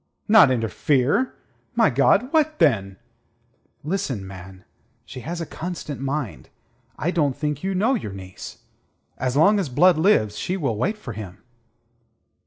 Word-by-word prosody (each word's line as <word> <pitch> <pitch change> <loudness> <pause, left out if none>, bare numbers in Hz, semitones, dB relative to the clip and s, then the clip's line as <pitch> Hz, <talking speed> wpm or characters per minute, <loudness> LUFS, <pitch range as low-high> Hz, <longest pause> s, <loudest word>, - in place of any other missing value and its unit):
"Not 210 -9 +7
interfere? 130 - +1 0.4
My 225 -9 +4
God, 195 - +2
what, 310 -1 +2
then?" 100 - +2 0.9
"Listen, 145 - -3
man. 95 0 -11 0.4
She - - -9
has 165 +7 -5
a 165 - -3
constant 160 -5 -6
mind. 135 - -4 0.5
I 170 - -1
don't 145 -7 0
think 150 -2 -2
you 195 0 -1
know 220 +8 +2
your 200 - -3
niece. 95 -1 -10 0.6
As 130 +1 -1
long 200 +7 +5
as 180 -8 -2
Blood 170 +6 +4
lives, 110 - +2
she 185 - -2
will 135 - -1
wait 190 - -1
for 125 - -8
him." 95 -4 -9
145 Hz, 145 wpm, -23 LUFS, 115-185 Hz, 0.9 s, Not